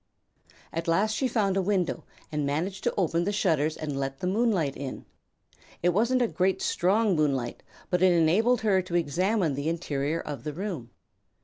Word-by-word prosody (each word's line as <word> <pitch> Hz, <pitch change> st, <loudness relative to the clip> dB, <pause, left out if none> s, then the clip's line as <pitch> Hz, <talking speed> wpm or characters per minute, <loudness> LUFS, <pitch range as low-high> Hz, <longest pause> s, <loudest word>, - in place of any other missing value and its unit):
At 165 Hz, +1 st, -3 dB
last 200 Hz, +6 st, +2 dB
she 265 Hz, -, +1 dB
found 205 Hz, -5 st, +1 dB
a 195 Hz, -, +2 dB
window 185 Hz, -2 st, 0 dB, 0.3 s
and 150 Hz, -1 st, -1 dB
managed 165 Hz, +7 st, -2 dB
to -, -, +2 dB
open 170 Hz, -3 st, +1 dB
the 200 Hz, -, 0 dB
shutters 160 Hz, -7 st, +1 dB
and 145 Hz, -3 st, -4 dB
let 135 Hz, 0 st, -3 dB
the 180 Hz, -, -5 dB
moonlight 190 Hz, -, +1 dB
in. 135 Hz, -1 st, -6 dB, 0.8 s
It 175 Hz, -, +4 dB
wasn't 235 Hz, +7 st, +2 dB
a -, -, +2 dB
very 190 Hz, -2 st, +1 dB
strong 200 Hz, +2 st, +2 dB
moonlight 135 Hz, -6 st, 0 dB, 0.3 s
but 180 Hz, -1 st, +1 dB
it 185 Hz, -1 st, +6 dB
enabled 185 Hz, +9 st, +3 dB
her 200 Hz, -4 st, +3 dB
to 180 Hz, -1 st, -5 dB
examine 175 Hz, +2 st, +1 dB
the 140 Hz, +3 st, -2 dB
interior 155 Hz, -2 st, -2 dB
of 145 Hz, -7 st, -6 dB
the 150 Hz, -, -4 dB
room. 170 Hz, -, -5 dB
175 Hz, 180 wpm, -27 LUFS, 150-200 Hz, 0.8 s, it